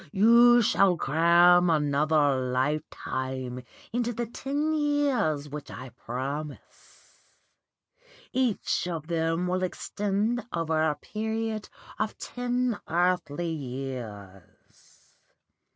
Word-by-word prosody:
You 235 Hz, +3 st, +6 dB
shall 195 Hz, -3 st, +3 dB
cram 170 Hz, +4 st, +5 dB
another 150 Hz, -1 st, +2 dB, 0.2 s
lifetime 130 Hz, -2 st, -3 dB, 0.3 s
into 240 Hz, 0 st, 0 dB
the 240 Hz, +1 st, -3 dB
ten 285 Hz, +6 st, -2 dB
years 280 Hz, -, +1 dB
which 145 Hz, 0 st, -8 dB
I 130 Hz, 0 st, -8 dB
promise. 140 Hz, +6 st, -8 dB, 1.1 s
Each 250 Hz, -7 st, 0 dB
of 165 Hz, -4 st, -4 dB
them 165 Hz, +1 st, 0 dB
will 180 Hz, +1 st, -1 dB
extend 205 Hz, +5 st, -1 dB
over 160 Hz, -2 st, 0 dB
a 155 Hz, -1 st, +1 dB
period 220 Hz, +1 st, -4 dB, 0.3 s
of 215 Hz, 0 st, -2 dB
ten 245 Hz, -2 st, -2 dB
earthly 175 Hz, -1 st, 0 dB
years. 125 Hz, -, -9 dB
170 Hz, 90 wpm, -27 LUFS, 145-220 Hz, 1.1 s, You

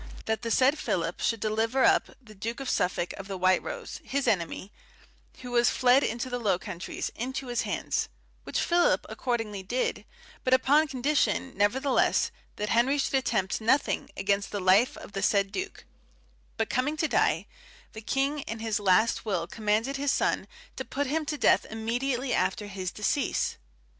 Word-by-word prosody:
that 220 Hz, 0 st, -1 dB
the 230 Hz, -, -3 dB
said 265 Hz, +6 st, +3 dB
Philip 170 Hz, -1 st, -2 dB
should 230 Hz, -, 0 dB
deliver 225 Hz, +5 st, +1 dB
up -, -, +4 dB
the 225 Hz, -5 st, -15 dB
Duke 225 Hz, +5 st, -5 dB
of 270 Hz, -2 st, -2 dB
Suffolk 180 Hz, -1 st, 0 dB
of 195 Hz, -, -7 dB
the 195 Hz, -1 st, -4 dB
White 185 Hz, 0 st, +3 dB
Rose, -, -, -7 dB
his 275 Hz, 0 st, -2 dB
enemy, 185 Hz, +1 st, -1 dB, 0.7 s
who 250 Hz, -1 st, -7 dB
was 240 Hz, 0 st, +4 dB
fled 255 Hz, +1 st, +4 dB
into 235 Hz, +3 st, -2 dB
the 245 Hz, -1 st, -3 dB
Low 205 Hz, -6 st, +2 dB
Countries, 185 Hz, -2 st, -5 dB
into 260 Hz, +2 st, -4 dB
his 240 Hz, -, 0 dB
hands; -, -, -2 dB, 0.3 s
which -, -, -2 dB
Philip 345 Hz, 0 st, +3 dB
accordingly 225 Hz, -5 st, -2 dB
did, 245 Hz, +7 st, -2 dB, 0.4 s
but 255 Hz, 0 st, +5 dB
upon 285 Hz, +4 st, +4 dB
condition, 265 Hz, 0 st, 0 dB
nevertheless, 250 Hz, +7 st, +2 dB, 0.2 s
that 210 Hz, +1 st, -3 dB
Henry 250 Hz, +5 st, +3 dB
should 280 Hz, -, -1 dB
attempt 220 Hz, -7 st, 0 dB
nothing 260 Hz, +6 st, +1 dB
against 200 Hz, +1 st, 0 dB
the 205 Hz, -, -3 dB
life 190 Hz, +6 st, +4 dB
of -, -, -10 dB
the 195 Hz, -, -4 dB
said 200 Hz, -1 st, +2 dB
Duke; 380 Hz, -, -5 dB, 0.7 s
but 225 Hz, -2 st, 0 dB
coming 280 Hz, +5 st, 0 dB
to 315 Hz, -, +1 dB
die, -, -, +2 dB, 0.5 s
the 220 Hz, -, -8 dB
king 275 Hz, +6 st, 0 dB
in 225 Hz, -, -4 dB
his 220 Hz, -1 st, -1 dB
last 205 Hz, +3 st, +3 dB
will 190 Hz, -6 st, -1 dB
commanded 220 Hz, +7 st, -1 dB
his 280 Hz, 0 st, +1 dB
son -, -, 0 dB, 0.3 s
to -, -, -3 dB
put 285 Hz, +2 st, -2 dB
him 310 Hz, +3 st, -1 dB
to 305 Hz, -2 st, -2 dB
death -, -, +4 dB
immediately 245 Hz, +3 st, -1 dB
after 210 Hz, -, 0 dB
his 190 Hz, -2 st, -4 dB
decease. 235 Hz, +6 st, -1 dB
230 Hz, 175 wpm, -28 LUFS, 205-265 Hz, 0.7 s, but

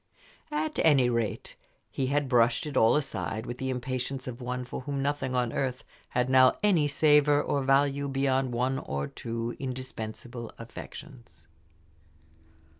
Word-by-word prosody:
At 305 Hz, 0 st, -2 dB
any 135 Hz, -6 st, +4 dB
rate, 115 Hz, -4 st, -2 dB, 0.4 s
he 130 Hz, -, -1 dB
had 145 Hz, +1 st, +1 dB
brushed 120 Hz, +1 st, +3 dB
it 150 Hz, -3 st, -5 dB
all 110 Hz, -2 st, +5 dB
aside 120 Hz, -6 st, -2 dB
with 120 Hz, 0 st, -6 dB
the 130 Hz, -, -2 dB
impatience 130 Hz, +1 st, -3 dB
of 125 Hz, 0 st, -7 dB
one 125 Hz, +1 st, -3 dB
for 125 Hz, -, -6 dB
whom 140 Hz, +1 st, -3 dB
nothing 140 Hz, -2 st, -1 dB
on 125 Hz, -2 st, 0 dB
earth 130 Hz, -2 st, -2 dB, 0.3 s
had 125 Hz, 0 st, 0 dB
now 130 Hz, 0 st, +5 dB
any 175 Hz, -8 st, +4 dB
savor 145 Hz, 0 st, +4 dB
or 145 Hz, -1 st, 0 dB
value 140 Hz, +1 st, +2 dB
beyond 135 Hz, -1 st, +1 dB
one 125 Hz, +3 st, 0 dB
or 70 Hz, 0 st, -3 dB
two 115 Hz, 0 st, -4 dB
indispensable 120 Hz, -2 st, -6 dB
affections. 115 Hz, -, -11 dB
130 Hz, 145 wpm, -28 LUFS, 120-140 Hz, 0.4 s, all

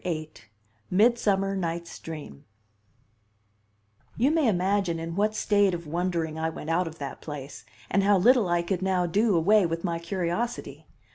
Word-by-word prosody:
VIII: 155 Hz, -3 st, -3 dB, 0.6 s
Midsummer 195 Hz, -2 st, +2 dB
Night's 170 Hz, -2 st, -4 dB
Dream 150 Hz, -, -9 dB, 1.7 s
You 260 Hz, +6 st, +3 dB
may 315 Hz, -4 st, +2 dB
imagine 190 Hz, -3 st, +1 dB
in 165 Hz, 0 st, -5 dB
what 210 Hz, +2 st, +1 dB
state 205 Hz, -4 st, +2 dB
of 170 Hz, 0 st, -7 dB
wondering 165 Hz, -1 st, -2 dB
I 160 Hz, 0 st, 0 dB
went 160 Hz, 0 st, -6 dB
out 175 Hz, +1 st, +1 dB
of 160 Hz, 0 st, -8 dB
that 140 Hz, -3 st, -7 dB
place, 145 Hz, -2 st, -8 dB, 0.2 s
and 195 Hz, -, +2 dB
how 200 Hz, 0 st, +4 dB
little 230 Hz, 0 st, +4 dB
I 175 Hz, 0 st, +1 dB
could 180 Hz, +1 st, -2 dB
now 185 Hz, -2 st, +1 dB
do 205 Hz, +4 st, +2 dB
away 190 Hz, +3 st, +4 dB
with 165 Hz, 0 st, -4 dB
my 170 Hz, -3 st, -1 dB
curiosity. 170 Hz, -, -3 dB
175 Hz, 155 wpm, -26 LUFS, 165-200 Hz, 1.7 s, how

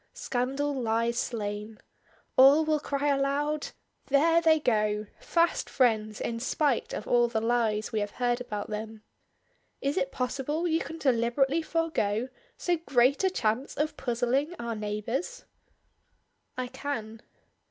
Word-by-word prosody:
Scandal 270 Hz, +4 st, -1 dB
lies 235 Hz, -1 st, 0 dB
slain. 210 Hz, -1 st, -4 dB, 0.6 s
All 280 Hz, +4 st, +7 dB
will 310 Hz, -1 st, +2 dB
cry 285 Hz, 0 st, -2 dB
aloud: 285 Hz, +2 st, 0 dB, 0.4 s
'There 325 Hz, +4 st, +4 dB
they 320 Hz, -1 st, +4 dB
go! 215 Hz, -5 st, +1 dB
Fast 335 Hz, 0 st, +1 dB
friends 215 Hz, -4 st, +1 dB
in 230 Hz, 0 st, -3 dB
spite 275 Hz, +1 st, 0 dB
of -, -, -5 dB
all 240 Hz, 0 st, +4 dB
the 230 Hz, -2 st, -1 dB
lies 225 Hz, -2 st, 0 dB
we 220 Hz, -, 0 dB
have 205 Hz, 0 st, -2 dB
heard 245 Hz, 0 st, +1 dB
about 210 Hz, -4 st, -5 dB
them.' 215 Hz, 0 st, -6 dB, 0.8 s
Is 280 Hz, +1 st, -1 dB
it 180 Hz, -1 st, 0 dB
possible 280 Hz, +6 st, -2 dB
you 325 Hz, -1 st, +2 dB
can 325 Hz, -, -6 dB
deliberately 270 Hz, +3 st, +2 dB
forego 265 Hz, -9 st, -1 dB, 0.3 s
so 350 Hz, -1 st, 0 dB
great 275 Hz, -1 st, +2 dB
a 380 Hz, -, +4 dB
chance 245 Hz, -, -1 dB
of 305 Hz, +2 st, -1 dB
puzzling 255 Hz, +6 st, 0 dB
our 235 Hz, -3 st, -4 dB
neighbors?" 215 Hz, -, -3 dB, 1.1 s
"I 255 Hz, -, -1 dB
can." 230 Hz, -5 st, -5 dB
250 Hz, 135 wpm, -28 LUFS, 225-290 Hz, 1.1 s, All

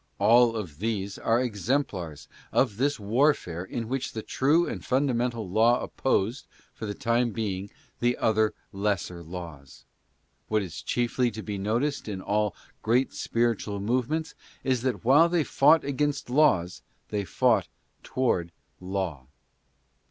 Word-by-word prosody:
All 115 Hz, +3 st, +5 dB
these 95 Hz, +4 st, -4 dB
are 115 Hz, +1 st, +2 dB
exemplars 105 Hz, -, -2 dB, 0.2 s
of 105 Hz, -, +2 dB
this 145 Hz, +2 st, +1 dB
warfare 105 Hz, -, +1 dB
in 115 Hz, +4 st, -5 dB
which 135 Hz, +2 st, -3 dB
the 110 Hz, -, -5 dB
true 155 Hz, +6 st, +2 dB
and -, -, -5 dB
fundamental 125 Hz, -4 st, 0 dB
law 115 Hz, +6 st, +4 dB
opposed, 120 Hz, -1 st, -1 dB, 0.3 s
for 110 Hz, -, -6 dB
the 105 Hz, -, -4 dB
time 120 Hz, -1 st, +1 dB
being, 100 Hz, -3 st, -3 dB, 0.3 s
the 120 Hz, +1 st, +1 dB
other 110 Hz, -1 st, +2 dB, 0.2 s
lesser 95 Hz, -3 st, -2 dB
laws. 80 Hz, -5 st, -9 dB, 0.6 s
What 110 Hz, -1 st, +1 dB
is 85 Hz, -6 st, -7 dB
chiefly 120 Hz, +1 st, 0 dB
to 110 Hz, -1 st, -7 dB
be 105 Hz, -2 st, -4 dB
noticed 120 Hz, +9 st, -1 dB
in 100 Hz, -3 st, -4 dB
all 105 Hz, +1 st, 0 dB, 0.3 s
great 125 Hz, +4 st, +2 dB
spiritual 115 Hz, -3 st, -1 dB
movements 130 Hz, +9 st, -1 dB, 0.3 s
is 130 Hz, -3 st, +1 dB
that 125 Hz, -2 st, -2 dB
while 150 Hz, +7 st, +6 dB
they 170 Hz, -2 st, +2 dB
fought 145 Hz, +3 st, +4 dB
against 140 Hz, -1 st, -1 dB
laws 110 Hz, -, +3 dB, 0.3 s
they 105 Hz, -1 st, -1 dB
fought 90 Hz, -, +2 dB, 0.3 s
toward 90 Hz, -10 st, 0 dB, 0.3 s
Law. 90 Hz, -8 st, -4 dB
115 Hz, 135 wpm, -27 LUFS, 100-130 Hz, 0.6 s, while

